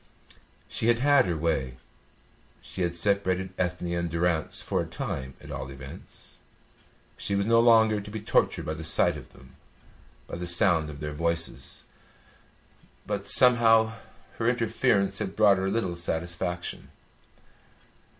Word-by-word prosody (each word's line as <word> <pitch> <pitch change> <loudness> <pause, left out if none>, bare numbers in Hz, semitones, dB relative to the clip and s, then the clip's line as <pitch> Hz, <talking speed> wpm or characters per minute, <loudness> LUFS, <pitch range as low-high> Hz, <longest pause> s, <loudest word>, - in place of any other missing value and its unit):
She 110 - -2
had 120 0 +4
had 145 +1 +4
her 85 -2 -1
way; 70 -6 -2 0.8
she 95 - -8
had 85 -1 -1
separated 95 0 0
Ethne 90 -1 -2
and 85 0 -2
Durrance 85 -1 -1
for - - -1
a - - -5
time 65 0 -5
at 75 - -12
all 65 -2 -6
events; 70 0 -12 0.8
she 100 - -2
was 100 0 0
no 115 +1 +4
longer 110 -2 +4
to 105 - -10
be 110 +1 -5
tortured 105 - 0
by 80 - -3
the 80 +1 -7
sight 80 - +2
of - - -11
them - - -18 0.7
and 85 - -7
the 90 - -3
sound 85 -3 +2
of 70 -1 -10
their 75 0 -4
voices; 85 +1 -2 1.2
but - - -4
somehow 115 -3 +6 0.5
her 115 - 0
interference 110 -5 +1
had 95 - -4
brought 105 -3 +5
her 95 +1 -1
little 95 -4 -1
satisfaction. 85 +1 -4
90 Hz, 145 wpm, -27 LUFS, 80-110 Hz, 1.2 s, somehow